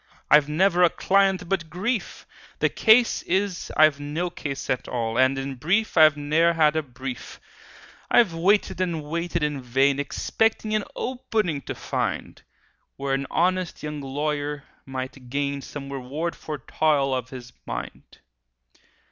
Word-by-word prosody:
I've 150 -1 +6
never 180 +3 +3
a 175 - +7
client 195 -1 +2
but 170 -3 -1
grief: 200 +7 -3 0.3
The - - +2
case 230 +1 +4
is, 190 0 -1
I've 155 -2 +5
no 155 +5 -3
case 140 -5 -5
at 125 0 -1
all, 115 -2 -2
And 130 +2 +3
in 135 0 -3
brief, 180 - 0
I've 155 -3 +6
ne'er 155 +4 +2
had 155 -2 +3
a 160 - +2
brief! 130 -3 -8 0.7
"I've 215 -8 +4
waited 185 +3 +2
and 170 -4 -1
waited 170 +2 -2
in 150 -2 -1
vain, 135 +3 +2
Expecting 215 +9 0
an 215 - 0
'opening' 215 - -2
to - - -4
find, - - -3 0.5
Where 135 0 -2
an 135 0 -1
honest 185 0 0
young 150 -1 -4
lawyer 145 +1 -3 0.2
might 130 -1 -6
gain 140 +1 -2
Some 140 0 -8
reward 140 +6 -4
for 155 -1 -6
toil 140 0 +1
of 130 -1 -3
his 125 -2 -10
mind. - - -7
150 Hz, 150 wpm, -24 LUFS, 135-180 Hz, 0.7 s, a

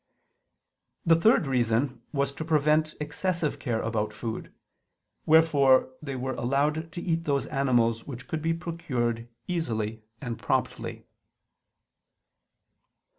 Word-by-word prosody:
The 165 -1 +6
third 165 0 +4
reason 125 -1 +1
was 140 -1 0
to 160 - -5
prevent 155 0 +2
excessive 155 +2 -2
care 120 -5 -1
about 110 -2 -1
food: 115 -2 -5 0.8
wherefore 145 -5 +5
they 140 -3 -5
were 130 +1 -2
allowed 150 +6 0
to 175 - -4
eat 165 -1 -1
those 140 -2 +1
animals 120 -5 +1
which 130 -3 -7
could 160 - -3
be 165 +1 +1
procured 125 -9 -2 0.2
easily 115 - -2 0.2
and 120 -4 -5
promptly. - - -2
140 Hz, 115 wpm, -27 LUFS, 120-160 Hz, 0.8 s, The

